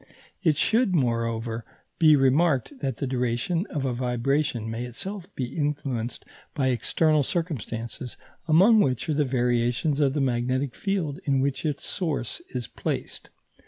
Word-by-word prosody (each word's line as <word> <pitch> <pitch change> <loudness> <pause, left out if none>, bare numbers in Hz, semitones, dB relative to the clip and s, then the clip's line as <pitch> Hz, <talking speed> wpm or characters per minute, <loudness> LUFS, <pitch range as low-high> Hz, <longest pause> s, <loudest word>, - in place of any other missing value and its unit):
It 160 -6 +3
should, 210 +4 +3
moreover, 115 -3 0 0.4
be 155 -3 +7
remarked 140 - +3
that 135 -4 -2
the - - -2
duration 125 - -1
of 145 -3 -3
a 130 - 0
vibration 125 0 0
may 115 +2 -3
itself 185 - -6
be 125 0 -4
influenced 140 -6 -2 0.3
by 135 -3 +2
external 150 +5 +2
circumstances, 125 - -3 0.3
among 190 +8 +6
which 130 - +1
are - - +2
the 150 0 +2
variations 125 +3 +1
of 140 -1 +2
the - - +1
magnetic 130 0 0
field 185 -8 -2
in 135 -2 +2
which 140 +3 0
its 145 -2 -3
source 150 - -2
is 125 -2 -4
placed. - - -4
135 Hz, 145 wpm, -26 LUFS, 120-155 Hz, 0.4 s, be